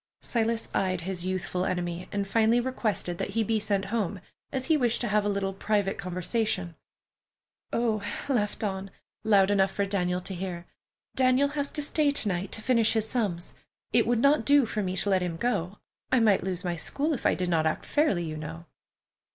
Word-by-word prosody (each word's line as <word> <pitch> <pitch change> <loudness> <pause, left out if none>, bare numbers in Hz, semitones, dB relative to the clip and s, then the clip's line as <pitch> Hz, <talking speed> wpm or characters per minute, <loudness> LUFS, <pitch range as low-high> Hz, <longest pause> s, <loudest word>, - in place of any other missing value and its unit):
Silas 230 -1 0
eyed 185 -2 0
his 185 0 -4
youthful 185 -1 -2
enemy, 175 -1 -3
and 200 -1 -2
finally 225 +3 +3
requested 225 -8 -2
that - - -2
he 225 - +3
be 220 +1 +1
sent 200 -2 0
home, 205 -4 -1 0.3
as 260 -1 -1
he 320 - +3
wished 245 -5 +2
to 240 - -1
have 210 -1 +2
a 205 - 0
little 195 -1 -1
private 200 0 0
conversation. 185 0 -1 1.0
"Oh!" 225 -3 0 0.3
laughed 220 -7 0
Dawn, 195 -2 -3 0.3
loud 205 -2 +4
enough 195 -1 +3
for 200 +1 -1
Daniel 180 -2 0
to 190 - -3
hear. 175 -1 -5 0.5
"Daniel 260 +2 +3
has 285 -1 -2
to 295 - +1
stay 295 0 +2
to 285 -6 +1
night 185 0 -2
to 220 - -2
finish 230 -3 +3
his 220 -1 0
sums. 205 -8 -2 0.4
It - - +4
would 240 - +2
not 280 +6 +4
do 285 -2 +5
for 215 -1 -2
me 185 -1 -2
to 205 - 0
let 190 -1 +3
him 175 -2 -2
go. 200 -4 -1 0.3
I 255 - +5
might 210 -6 +4
lose 180 -1 -3
my 175 -1 -1
school 290 - -1
if 265 - 0
I - - +3
did 180 -1 -2
not 160 -2 +2
act 155 - -2
fairly, 290 - +1
you 155 -2 -5
know." 160 +2 -7
200 Hz, 200 wpm, -28 LUFS, 180-235 Hz, 1.0 s, do